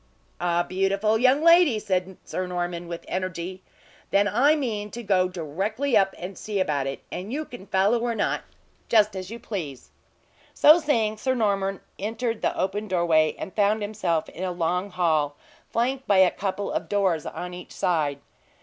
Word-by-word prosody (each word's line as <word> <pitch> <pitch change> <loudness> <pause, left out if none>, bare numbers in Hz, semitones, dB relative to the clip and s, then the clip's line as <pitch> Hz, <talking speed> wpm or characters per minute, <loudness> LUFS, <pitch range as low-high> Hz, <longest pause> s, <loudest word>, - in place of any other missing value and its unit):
"A 175 0 +1
beautiful 195 +3 +1
young 260 +5 +4
lady!" 335 -7 +6
said 185 -2 -2
Sir 185 0 -3
Norman, 175 -1 -3
with 170 0 -7
energy. 185 0 -4 0.5
"Then 200 +1 +3
I 265 +10 +4
mean 220 -8 -3
to 240 +3 -7
go 190 -3 +2
directly 195 - -2
up 195 0 +3
and 185 +2 -7
see 210 +1 -3
about 145 -7 0
it, 135 - -5
and 190 +5 -5
you 305 +4 -2
can 245 -8 -11
follow 200 +4 +2
or 235 0 -1
not, - - 0 0.5
just 215 -2 +4
as 185 -1 -5
you 230 - -6
please." 165 - -6 0.6
So 310 +3 +7
saying, 230 -9 +1
Sir 260 +4 0
Norman 195 -4 0 0.2
entered 225 +2 -2
the - - -1
open 205 +3 -1
doorway, 170 -4 +2
and 190 - -7
found 210 +1 +2
himself 190 -6 -1
in 180 - -7
a 185 - -1
long 180 +3 -1
hall, 155 -6 +1 0.3
flanked 260 +3 -1
by 200 - +4
a 190 -1 +6
couple 200 +1 -3
of - - -3
doors 190 -6 +1
on 180 0 -6
each 180 0 -9
side. 155 -5 0
195 Hz, 175 wpm, -25 LUFS, 180-220 Hz, 0.6 s, So